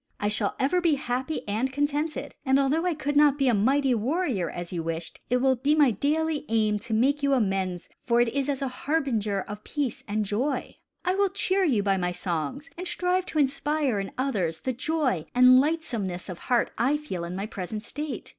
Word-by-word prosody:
I 205 - 0
shall 210 -1 0
ever 355 +7 +2
be 335 -4 +3
happy 265 0 -3
and 225 +6 -1
contented; 290 +3 -1
and 265 0 +3
although 290 +6 +2
I 350 - 0
could 290 -1 -2
not 290 -1 +5
be 275 -2 +2
a 245 - +4
mighty 265 +6 +3
warrior 245 - 0
as 175 +2 -6
you 170 - -2
wished, 165 0 -5
it 250 - +3
will 260 +1 +3
be 280 +5 +2
my 290 -5 +5
daily 300 +7 0
aim 215 -2 +2
to 225 +2 -5
make 280 +6 +2
you 280 -1 +2
amends 190 -6 -1 0.2
for 235 -1 +2
it 240 +1 +2
as 275 0 -1
a - - 0
harbinger 250 -8 -1
of 210 +2 -8
peace 285 -6 -3
and 210 +1 -1
joy. 235 +9 -2 0.3
I 365 - +2
will 400 0 +2
cheer 390 0 0
you 235 - +2
by 195 -1 +2
my 180 -1 -1
songs 175 - -3
and 365 - -4
strive 360 +1 0
to - - -4
inspire 285 -3 +1
in 195 - -4
others 190 -12 -1
the 260 - -1
joy 260 - -1
and 255 +1 +8
lightsomeness 235 - -2
of 180 - -6
heart 245 -2 +1
I 265 +6 +3
feel 240 - -5
in 170 +1 -5
my 195 +2 -3
present 210 +1 -6
state. 290 -3 -5
255 Hz, 205 wpm, -26 LUFS, 205-295 Hz, 0.3 s, and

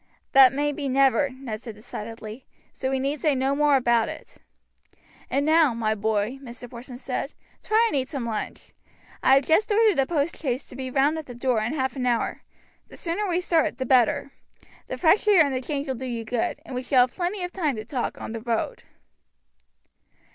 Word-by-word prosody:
"That 265 -1 +8
may 290 +2 0
be 285 -2 -4
never," 275 +2 +3
Ned 255 -5 -7
said 230 -4 -8
decidedly, 220 +2 -8 0.3
"so 260 - -3
we 265 0 0
need 280 +3 -1
say 300 -1 +2
no 265 +1 +1
more 295 0 +3
about 235 -3 +2
it." - - -10 0.9
"And 280 +1 0
now, 310 -5 +4
my 220 -2 0
boy," 215 +4 -1
Mr. 245 -1 -9
Porson 245 +1 -9
said, - - -4 0.3
"try 440 +2 +3
and 445 - -2
eat 260 -2 0
some 270 -6 -4
lunch. 220 -2 -5 0.5
I 265 - +6
have 270 0 +3
just 420 +7 +2
ordered 425 -6 +4
a 265 - +2
post 320 0 -1
chaise 260 -3 -2
to - - -11
be 260 0 -5
round 285 +4 +2
at 310 - -9
the 245 - -9
door 240 -2 0
in 235 +7 -2
half 265 -2 -1
an 250 -2 -2
hour. 240 -2 0 0.5
The - - -13
sooner 360 +5 -2
we 355 -1 +1
start 330 -3 +1
the 260 - -3
better. 255 +2 +3 0.6
The - - -5
fresh 375 +5 +3
air 375 -7 +6
and 280 - -2
the 255 - -1
change 280 +1 -3
will 265 - -1
do 260 +1 -6
you 230 -2 -4
good, 230 +1 -2
and - - -9
we 250 - -2
shall 255 0 +3
have 245 0 +1
plenty 365 +1 -2
of 355 - -4
time 310 -8 0
to 215 0 -6
talk 250 +1 -3
on - - -6
the 230 0 -5
road." 235 - -2
265 Hz, 210 wpm, -25 LUFS, 240-300 Hz, 0.9 s, That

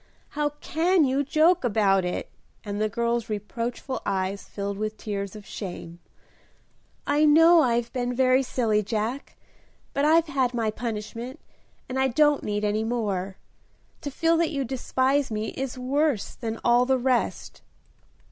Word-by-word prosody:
"How 295 0 -1
can 335 +1 +2
you 270 +2 +1
joke 320 +5 +3
about 200 -5 +3
it!" 180 - -4 0.3
and 205 0 -4
the 215 - +1
girl's 235 +1 -1
reproachful 230 +5 -4
eyes 190 +1 -2
filled 200 0 -5
with 215 0 -3
tears 200 -1 -4
of 210 -1 -10
shame. 175 -4 -7 1.1
"I 290 +1 +2
know 325 +3 +7
I've 235 -3 0
been 245 -1 -2
very 255 +1 +4
silly, 230 -5 +1
Jack, 220 +6 -3 0.6
but 280 - 0
I've 320 +2 +5
had 265 -5 0
my 225 -2 0
punishment, 230 +2 -5 0.5
and 260 +1 -3
I 265 - +3
don't 295 +3 +3
need 210 0 -2
any 210 +1 0
more. 200 -5 -2 0.6
To 285 - -4
feel 330 +4 +2
that 335 -1 +2
you 275 -3 -2
despise 265 +2 0
me 215 0 -3
is 270 -1 -5
worse 270 -1 0
than 225 -2 -5
all 240 +1 +4
the 265 0 +3
rest." 255 -1 -1
245 Hz, 150 wpm, -25 LUFS, 215-275 Hz, 1.1 s, know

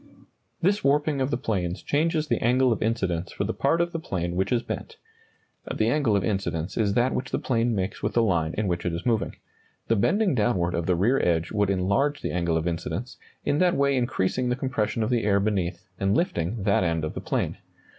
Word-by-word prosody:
This 200 +4 +2
warping 145 0 +2
of 130 - +1
the 120 - 0
planes 95 -7 -2
changes 155 +1 +1
the 120 - 0
angle 125 +2 +3
of 115 - -1
incidence 95 -6 -1
for - - -3
the 110 +3 -2
part 150 +5 +1
of 170 0 +1
the 165 - -3
plane 90 - -3
which 95 +2 0
is 120 -2 +2
bent. - - -6 0.7
(The 110 +1 +1
angle 125 -5 +2
of 100 - +1
incidence 90 -3 -2
is 105 -3 +1
that 125 +2 +2
which 125 0 -3
the - - -1
plane 115 -2 0
makes 95 +2 -3
with - - -1
the 120 - +4
line 85 -6 +1
in 105 -1 0
which 85 -1 -1
it 85 - -1
is 85 - -6
moving. 115 -4 0 0.5
The 115 - +4
bending 195 - +2
downward 100 -7 +1
of 85 -1 -2
the 90 - +3
rear 115 +10 +2
edge 85 -1 +1
would 105 -2 +1
enlarge 100 +10 +1
the - - -1
angle 85 -2 0
of 80 +1 -1
incidence, 95 +9 -4 0.3
in 145 - +1
that 180 -1 +3
way 140 0 +2
increasing 125 -1 0
the 125 - +1
compression 120 -4 -1
of 110 - -1
the 120 -2 +1
air 100 -1 +3
beneath, 95 -4 -1
and 100 +3 +2
lifting 100 - -1
that 100 -1 +3
end 80 -2 0
of 75 - -4
the - - -5
plane.) - - -2
110 Hz, 225 wpm, -26 LUFS, 90-130 Hz, 0.7 s, the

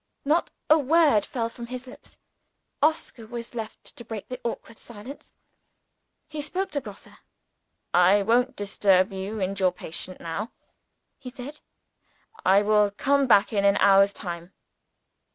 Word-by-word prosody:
Not 310 +4 +2 0.2
a 310 +1 +6
word 295 -6 +3
fell 230 -3 -2
from 235 +1 -9
his 255 +1 -7
lips. 255 - -14 0.6
Oscar 290 -7 0
was 235 +1 -7
left 225 -2 -7
to 235 - -9
break 220 -3 -8
the 255 0 -6
awkward 230 -1 -6
silence. 235 +5 -11 0.9
He 305 -1 -5
spoke 370 +7 -3
to 285 - -2
Grosse. 210 -5 -11 0.8
"I 185 +3 +5
won't 245 +5 +2
disturb 195 -1 +2
you 195 +3 -5
and 195 0 -2
your 185 -1 +3
patient 180 +1 -5
now," 195 +7 -5 0.7
he 265 -2 -8
said. 265 +4 -9 0.8
"I 200 +2 +5
will 210 0 +3
come 275 +6 +1
back 205 -1 +4
in 200 -1 +1
an 200 0 +4
hour's 195 0 +5
time." 175 -2 -7
225 Hz, 145 wpm, -25 LUFS, 200-255 Hz, 0.9 s, a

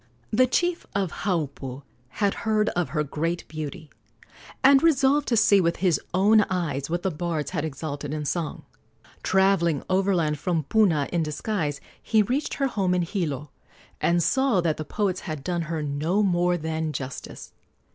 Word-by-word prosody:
The 255 +4 +4
chief 345 +6 0
of 195 -4 0
Haupu 140 -7 -2 0.2
had 200 +9 0
heard 215 -1 +2
of 175 -5 -1
her 150 +2 0
great 165 +4 -3
beauty, 155 -1 -7 0.7
and 270 0 +7
resolved 290 -2 +3
to 235 - +2
see 205 -2 +5
with 170 -1 +1
his 180 -4 +1
own 210 +4 +5
eyes 155 -7 -2
what 175 +1 -2
the 190 - 0
bards 160 -2 -3
had 145 - -2
exalted 145 -1 -5
in 150 -1 -3
song. 165 +2 -3 0.6
Travelling 190 -6 +2
overland 180 -6 +1
from 165 -1 0
Puna 165 -5 +2
in 170 - +2
disguise, 155 -1 -2 0.2
he 220 -2 +3
reached 260 +8 -1
her 275 - 0
home 195 -8 0
in 180 - +1
Hilo, 150 - -3 0.5
and 170 0 +2
saw 255 - +2
that 165 -3 0
the 155 - -5
poets 190 0 -1
had 155 -5 -6
done 175 0 -1
her 160 -2 -2
no 155 +8 0
more 175 -2 +2
than 160 -1 -3
justice. 130 -1 -7
175 Hz, 165 wpm, -25 LUFS, 150-200 Hz, 0.7 s, and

